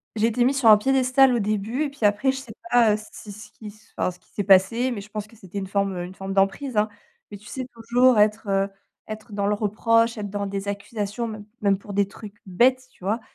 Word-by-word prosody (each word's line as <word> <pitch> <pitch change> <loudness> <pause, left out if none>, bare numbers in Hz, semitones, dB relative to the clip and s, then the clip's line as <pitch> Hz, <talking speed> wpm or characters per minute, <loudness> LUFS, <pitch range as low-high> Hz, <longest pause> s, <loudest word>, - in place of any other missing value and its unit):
j'ai 220 +1 +2
été 240 +2 +1
mise 270 +1 +1
sur 230 -4 +5
un 210 - +9
piédestal 260 +2 +3
au 235 - +1
début 215 +7 -1
et 290 - -2
puis, 275 -6 -3
après, 205 +6 +3
je 265 - -6
sais 250 -5 -9 0.2
pas, 230 -3 +5
heu, - - 0 0.2
si 210 - -10
ce 210 +1 -12
qui 215 - -12 0.3
enfin, 185 - 0
ce 180 - -17
qu'il - - -32
s'est 205 - -2
passé, 205 +6 +4
mais 205 -4 -4
je 210 - -13
pense 210 0 -5
que 230 - -19
c'était 200 -2 -10
une 190 - -5
forme 195 -1 -1
une 180 +2 -6
forme 195 0 -5
d'emprise, 195 +7 0
hein. 210 +1 +2 0.4
Mais, 205 - -7
tu 210 - -20
sais, 260 -2 -5
toujours 235 +1 +3
être, 210 0 +2
heu, 195 0 +2 0.4
être 215 +1 -8
dans 200 0 -1
le 210 - +2
reproche, 230 +2 +1
être 205 -1 -4
dans 200 0 -3
des 195 0 -5
accusations, 205 +2 -4
même 215 -2 -8 0.2
même 200 -2 +2
pour 200 0 -10
des 200 0 +2
trucs 205 0 -12
bêtes, 255 +7 +2
tu - - -22
vois? 220 +3 0
210 Hz, 250 wpm, -24 LUFS, 200-235 Hz, 0.4 s, un